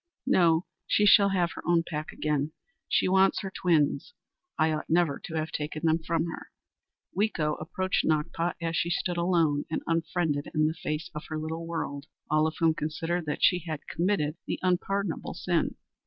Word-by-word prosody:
"No, 170 -1 +4 0.2
she 210 - +3
shall 200 -1 +7
have 180 -3 +1
her - - -7
own 170 -1 +4
pack 155 -1 -4
again. 150 0 -1 0.4
She - - +3
wants 190 +1 +4
her 195 -2 -5
twins. 170 - +1 0.4
I 155 0 +3
ought 155 0 -3
never 165 -4 +2
to 160 - -6
have 155 -1 -2
taken 150 +2 -3
them 160 0 +3
from 165 0 -1
her!" 165 - -7 0.7
Weeko 180 -7 +1
approached 185 +4 -1
Nakpa 160 +2 0
as 165 -1 -2
she 170 - +1
stood 175 0 -1
alone 170 -4 +2
and 160 - -2
unfriended 165 -3 0
in 155 0 +3
the 155 - +1
face 155 -1 -4
of 150 - -6
her 155 - -3
little 160 +2 -4
world, 145 -3 -4 0.2
all 155 +1 +4
of 160 - -4
whom 165 -1 +3
considered 165 +2 -2
that 150 - -2
she 180 - +5
had 155 -3 -6
committed 170 -4 0
the - - -1
unpardonable 185 0 -1
sin. - - 0
165 Hz, 180 wpm, -28 LUFS, 155-175 Hz, 0.7 s, shall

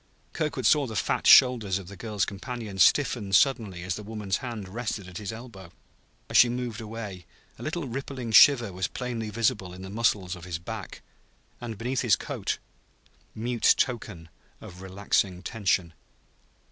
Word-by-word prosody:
Kirkwood 145 -5 -2
saw 145 -3 +4
the 110 - -7
fat - - 0
shoulders 115 -7 +6
of 95 -3 -9
the 100 - -10
girl's 105 0 -2
companion 105 -1 -6
stiffen 115 -5 +3
suddenly 105 -9 +2
as 90 +1 -2
the 105 - -6
woman's 105 -2 -3
hand 115 -7 -6
rested 105 -2 -4
at 90 -2 -8
his 105 -1 -5
elbow; 110 -6 -11 0.6
as - - +1
she 125 - +7
moved 120 -2 -4
away, 105 -5 -7 0.3
a - - -10
little 155 -1 -3
rippling 130 -1 -5
shiver 120 -4 +7
was 95 +1 -2
plainly 120 -4 -4
visible 105 -4 -1
in 95 - -10
the 95 - -8
muscles 100 -4 0
of 90 -1 -11
his 90 -3 -4
back, 105 +3 -8 0.6
beneath 120 +2 -3
his - - +4
coat - - -4 0.8
mute 120 +1 +2
token 105 -9 -2 0.3
of 90 +1 -11
relaxing 95 -1 -1
tension. 95 -7 0
110 Hz, 160 wpm, -27 LUFS, 95-120 Hz, 0.8 s, she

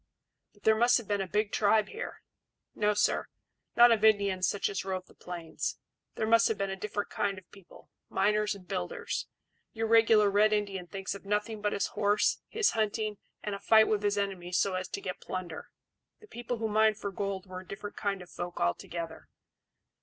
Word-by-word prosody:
"But 205 - -25
there 220 - +6
must 240 +2 +5
have 235 -5 -6
been 205 -1 0
a 190 - -3
big 210 +2 0
tribe 215 0 +3
here." 455 +3 -7 0.5
"No, 210 0 +1
sir; 205 - +1 0.5
not 240 0 +8
of 220 -2 +2
Indians 200 -4 +4
such 205 - 0
as 195 - -3
rove 185 -1 -3
the - - -20
plains. 170 -2 -5 0.4
These 220 - -1
must 230 +1 +5
have 220 - -1
been 195 -1 -2
a - - -2
different 205 +1 -4
kind 200 -1 -1
of 185 -2 -12
people 195 -3 -17 0.2
miners 210 +1 +1
and 185 -2 -14
builders. 90 - -3 0.5
Your 225 0 -2
regular 225 -2 +5
Red 210 +2 +4
Indian 200 -4 -2
thinks 195 0 -4
of 200 - -9
nothing 210 +2 -2
but 210 0 0
his 200 - 0
horse, 205 0 +2
his 440 -2 +2
hunting, 215 -1 -1 0.2
and 210 - -3
a 200 - -4
fight 220 +2 +5
with 210 -2 +1
his 205 0 +1
enemies 185 -3 -2
so 195 - +2
as 185 0 -2
to 200 - -5
get 185 -2 -5
plunder. 180 -3 -6 0.5
The 430 - -15
people 240 - -4
who 225 0 -1
mined 215 0 +3
for 200 -2 -4
gold 195 -1 -3
were 185 -1 -7
a 185 - -13
different 205 +1 -7
kind 195 -2 -2
of 175 - -17
folk 175 0 -6
altogether." 160 - -3
205 Hz, 200 wpm, -30 LUFS, 190-215 Hz, 0.5 s, not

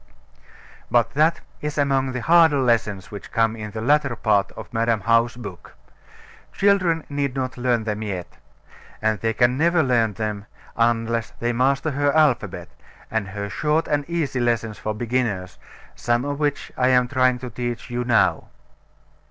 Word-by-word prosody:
But 120 -2 +2
that 160 +3 +2 0.2
is 150 0 -4
among 135 -2 +1
the 125 - -3
harder 165 -3 +5
lessons 115 -6 0
which 100 - -9
come 115 0 +1
in 105 -1 -6
the 110 +1 -6
latter 140 +1 +2
part 105 -3 +1
of - - -10
Madam 115 -1 +1
How's 115 +3 +2
book. 100 -7 -10 0.8
Children 185 -5 +2
need 140 -2 -2
not 130 0 -3
learn 120 -3 0
them 105 -1 -3
yet; 95 -5 -5 0.6
and 110 -1 0
they 115 - 0
can 120 +3 +2
never 170 0 +3
learn 115 -5 +2
them, 105 -1 -4 0.3
unless 115 -1 0
they 120 +1 0
master 135 +5 +1
her 145 +1 +1
alphabet, 150 -5 +1 0.4
and 110 -3 -1
her 100 +1 -5
short 150 +10 0
and 145 +1 -1
easy 160 -6 -1
lessons 115 -3 -1
for 110 0 -3
beginners, 110 -6 -2 0.3
some 120 +2 0
of 145 0 -3
which 145 -2 -1
I 125 - +2
am 125 -1 +4
trying 130 -1 +2
to 125 0 -8
teach 120 +1 -5
you 120 0 -1
now. 120 -2 +2
120 Hz, 160 wpm, -22 LUFS, 110-140 Hz, 0.8 s, harder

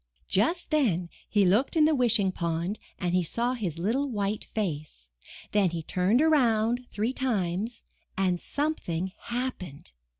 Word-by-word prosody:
Just 325 - +1
then 195 - +2 0.2
he 205 -2 +3
looked 210 - +3
in 310 -2 +6
the 315 - +4
Wishing 235 -7 +3
Pond 170 +3 -2 0.2
and 180 -1 -1
he 180 - +4
saw 235 +9 -1
his 190 -10 -3
little 240 +11 0
white 205 -2 -2
face. 150 - -4 0.4
Then 205 -3 +3
he 165 -1 -4
turned 190 - +2
around 245 -5 +3
three 220 +5 -1
times 220 -4 -1 0.3
and 185 -2 +1
something 190 - -2
happened. 235 - -4
210 Hz, 140 wpm, -28 LUFS, 180-250 Hz, 0.4 s, in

